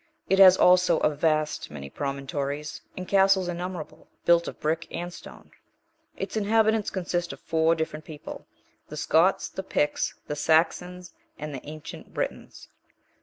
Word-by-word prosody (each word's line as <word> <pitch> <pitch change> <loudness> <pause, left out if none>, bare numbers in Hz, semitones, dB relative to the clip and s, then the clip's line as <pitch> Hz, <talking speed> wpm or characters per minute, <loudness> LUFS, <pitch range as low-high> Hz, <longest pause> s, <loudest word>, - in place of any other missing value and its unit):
It 195 - +2
has 190 -1 +9
also 180 -2 +5
a - - +3
vast 155 0 0
many 70 -2 -8
promontories, 140 - -4 0.2
and 185 -1 -5
castles 195 -1 +4
innumerable, 175 -2 -6 0.2
built 170 0 +4
of - - -7
brick 160 +2 -1
and 175 +1 -5
stone. - - -13 0.7
Its - - -5
inhabitants 220 0 +2
consist 175 -2 -2
of - - -12
four 160 0 +2
different 160 -1 -4
people; 150 -2 -9 0.4
the 150 - -8
Scots, 165 +4 +3
the - - -6
Picts, 150 -5 -1
the 150 - -4
Saxons 175 +3 +1 0.2
and 150 0 -6
the 130 - -6
ancient 155 0 -9
Britons. - - -5
165 Hz, 145 wpm, -26 LUFS, 150-180 Hz, 0.7 s, has